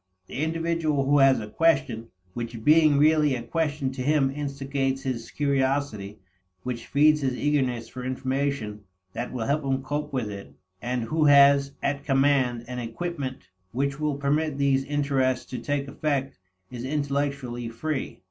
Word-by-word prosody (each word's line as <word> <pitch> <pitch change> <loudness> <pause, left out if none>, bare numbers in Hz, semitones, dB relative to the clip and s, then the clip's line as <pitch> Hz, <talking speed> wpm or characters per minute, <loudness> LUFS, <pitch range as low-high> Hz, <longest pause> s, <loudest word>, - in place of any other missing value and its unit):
The 130 - -5
individual 165 -3 0
who 145 +1 +4
has 135 -1 +5
a 105 - -5
question 130 -4 +1 0.3
which 115 -1 -6
being 155 0 +5
really 150 -1 +4
a 120 - -5
question 145 0 -1
to 130 -1 -6
him 140 0 +2
instigates 135 -1 -2
his 125 -4 -3
curiosity, 135 -7 -1 0.5
which 120 -2 -5
feeds 150 +2 +4
his 130 -2 0
eagerness 130 -5 0
for 125 +1 -8
information 130 -4 -2 0.3
that 120 - -4
will 120 -3 -3
help 145 +3 0
him 135 -1 -1
cope 150 +2 -3
with 125 -6 -2
it, 100 -1 -9 0.3
and 125 0 -2
who 155 +7 +1
has 140 -1 +6
at 140 0 -1
command 135 -4 +2
an 125 0 -5
equipment 130 +3 -5 0.3
which 140 +3 -1
will 150 -2 0
permit 145 +1 0
these 135 -1 +2
interests 135 -3 0
to 125 - -3
take 140 +3 -2
effect, 140 -1 -2 0.4
is 120 -1 -6
intellectually 140 -4 -2
free. 135 +5 -4
140 Hz, 155 wpm, -26 LUFS, 125-145 Hz, 0.5 s, has